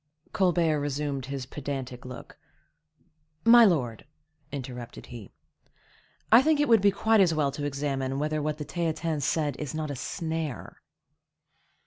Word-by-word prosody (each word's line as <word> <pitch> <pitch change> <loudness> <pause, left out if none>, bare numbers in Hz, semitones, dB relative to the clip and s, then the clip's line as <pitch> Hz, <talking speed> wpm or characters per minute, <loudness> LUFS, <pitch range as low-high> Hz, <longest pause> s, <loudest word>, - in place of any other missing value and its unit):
Colbert 170 -5 +2
resumed 145 -2 -3
his 135 -2 -4
pedantic 130 -3 -6
look. 125 0 -10 1.1
"My 235 0 +9
lord," 135 - 0 0.4
interrupted 125 -3 -7
he, 115 -5 -10 1.0
"I 230 +3 +9
think 305 +1 +2
it 295 - +3
would 225 -4 +5
be 200 - +5
quite 220 +2 +2
as 170 -4 +3
well 145 -3 +1
to 145 +1 -5
examine 135 -2 -2
whether 150 +1 -1
what 150 0 -2
the 150 - -5
Theatin 165 -2 -2
said 145 0 0
is 150 0 -5
not 155 -2 -3
a - - -4
snare." 160 - -5
150 Hz, 140 wpm, -27 LUFS, 135-170 Hz, 1.1 s, My